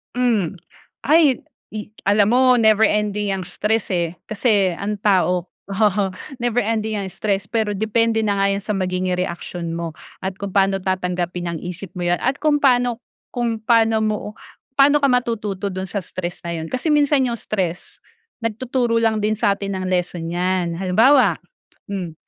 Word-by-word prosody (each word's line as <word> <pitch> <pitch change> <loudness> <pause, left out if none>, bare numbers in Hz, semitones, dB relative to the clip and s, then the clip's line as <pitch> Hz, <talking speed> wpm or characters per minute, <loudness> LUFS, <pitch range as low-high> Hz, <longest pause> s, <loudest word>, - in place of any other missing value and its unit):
Hmm. 215 -9 0 0.4
Ay, 300 -3 +4 0.3
i 210 -1 -6 0.2
alam 205 +3 +3
mo 255 -1 +5
never 220 -1 +4
ending 210 -1 +1
yang 185 -2 -3
stress, 210 +4 -1
eh, 170 -1 0 0.2
kasi 205 -5 +2
ang 200 +2 -4
tao 180 -3 +2 0.2
oo. 205 0 +2 0.3
Never 240 -1 0
ending 220 -1 -1
ang 195 - -4
stress 195 0 -2
pero 220 -1 0
depende 225 +2 +1
na 205 -2 +1
nga 195 0 +2
yan 195 - -1
sa 210 +1 -3
magiging 185 -1 -1
reaksyon 175 -1 -4
mo 165 -1 -4 0.2
at 190 0 -4
kung 200 0 -6
paano 195 -1 +2
tatanggapin 180 -2 -2
ng 170 -1 -3
isip 180 +2 -6
mo 180 - -3
yan 175 0 +1
at 260 +2 0
kung 295 -1 +3
paano 245 -3 +3 0.3
kung 240 -2 -1
paano 225 -1 +3
mo, 215 -1 0 0.6
paano 285 +2 +5
ka 280 - +3
matututo 215 -6 -1
do'n 190 0 -4
sa 200 +1 -3
stress 175 0 -6
na 170 -1 -3
yun 160 - -5
kasi 255 - -1
minsan 290 -2 +3
yung 235 -2 -1
stress, 180 -5 -4 0.4
nagtuturo 230 +1 0
lang 220 -2 +1
din 215 - +2
sa 200 -2 +3
atin 195 -1 -4
ng 185 - -4
lesson 180 -2 -1
yan. 175 0 -1
Halimbawa, 200 - +4 0.5
hmm, 180 -5 -4
205 Hz, 170 wpm, -21 LUFS, 185-230 Hz, 0.6 s, mo